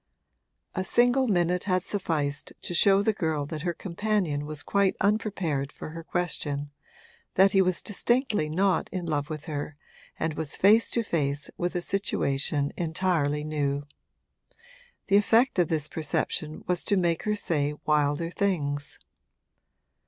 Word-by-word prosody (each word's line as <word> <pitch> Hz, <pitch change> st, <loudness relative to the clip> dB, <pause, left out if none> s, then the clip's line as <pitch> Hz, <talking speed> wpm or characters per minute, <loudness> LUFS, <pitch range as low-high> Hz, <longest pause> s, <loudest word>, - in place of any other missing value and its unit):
A 185 Hz, -, -1 dB
single 245 Hz, +6 st, +3 dB
minute 180 Hz, -3 st, +1 dB
had 185 Hz, -2 st, +1 dB
sufficed 155 Hz, -8 st, -2 dB
to -, -, -3 dB
show 195 Hz, +3 st, +5 dB
the 220 Hz, -, +2 dB
girl 160 Hz, -7 st, -1 dB
that 155 Hz, +1 st, -5 dB
her 175 Hz, +1 st, -1 dB
companion 180 Hz, -6 st, -1 dB
was 150 Hz, -1 st, -4 dB
quite 200 Hz, -1 st, +2 dB
unprepared 195 Hz, -9 st, 0 dB
for -, -, -8 dB
her 165 Hz, +1 st, -8 dB
question, 145 Hz, -5 st, -2 dB, 0.6 s
that 195 Hz, +1 st, +6 dB
he 195 Hz, -, +5 dB
was 185 Hz, -1 st, +1 dB
distinctly 220 Hz, -, +1 dB
not 185 Hz, +4 st, +1 dB
in 180 Hz, -2 st, -3 dB
love 150 Hz, -2 st, -1 dB
with 155 Hz, -1 st, -6 dB
her 150 Hz, -2 st, -4 dB, 0.4 s
and 160 Hz, -1 st, -1 dB
was 155 Hz, -1 st, -2 dB
face 215 Hz, +4 st, +5 dB
to 235 Hz, -, +1 dB
face 145 Hz, -7 st, -1 dB
with 175 Hz, +1 st, -2 dB
a 175 Hz, -, 0 dB
situation 145 Hz, -7 st, 0 dB
entirely 160 Hz, -4 st, 0 dB
new. 145 Hz, -2 st, -1 dB, 1.2 s
The 200 Hz, -, +4 dB
effect 225 Hz, +2 st, +3 dB
of 175 Hz, -, +4 dB
this 155 Hz, -2 st, -1 dB
perception 155 Hz, 0 st, -2 dB
was 180 Hz, -1 st, -1 dB
to 200 Hz, -, +2 dB
make 170 Hz, -3 st, +1 dB
her 210 Hz, 0 st, +1 dB
say 150 Hz, -7 st, -1 dB
wilder 150 Hz, +2 st, +1 dB
things. 145 Hz, -8 st, -1 dB
170 Hz, 145 wpm, -27 LUFS, 150-195 Hz, 1.2 s, that